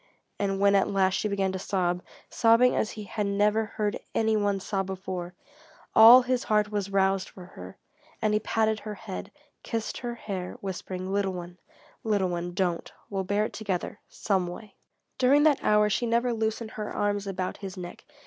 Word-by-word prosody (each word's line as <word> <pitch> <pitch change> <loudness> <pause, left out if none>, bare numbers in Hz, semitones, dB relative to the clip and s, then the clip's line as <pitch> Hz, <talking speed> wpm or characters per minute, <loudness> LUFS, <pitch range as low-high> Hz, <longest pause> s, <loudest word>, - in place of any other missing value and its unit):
And 195 -1 -1
when 200 0 +4
at 200 +1 +3
last 190 -2 +2
she 210 - 0
began 195 -2 0
to 190 - -4
sob 180 -2 -1 0.3
sobbing 230 +1 +4
as 215 - 0
he 215 - -7
had 205 +1 -3
never 210 +2 +2
heard 210 0 -2 0.2
any 220 -1 +2
one 205 -2 +1
sob 195 0 -2
before 185 -2 -5 0.6
all 235 +3 +9
his 250 0 -1
heart 210 -1 +2
was 205 -2 -2
roused 195 -1 +1
for 185 - -12
her, - - -10 0.4
and 215 -1 +1
he 210 - +3
patted 220 0 0
her 210 0 -6
head, 195 -2 -7 0.3
kissed 225 -2 -4
her 240 -1 -4
hair, 190 -5 -5
whispering: 185 0 -5
"Little 200 -1 0
one, 180 0 -8 0.4
little 205 -4 +1
one, 175 0 -4
don't. 180 -3 -1 0.2
We'll 195 -1 -2
bear 205 +2 +1
it - - -6
together 205 0 -3
some 190 -4 -1
way." 195 +3 -9 0.5
During 275 +3 +5
that 300 -3 +3
hour 210 0 +4
she 235 +3 0
never 235 +1 +1
loosened 220 0 -2
her 210 -1 -5
arms 205 -1 -1
about 185 -1 -3
his 195 -1 -8
neck. 175 -1 -8
200 Hz, 185 wpm, -27 LUFS, 190-220 Hz, 0.6 s, all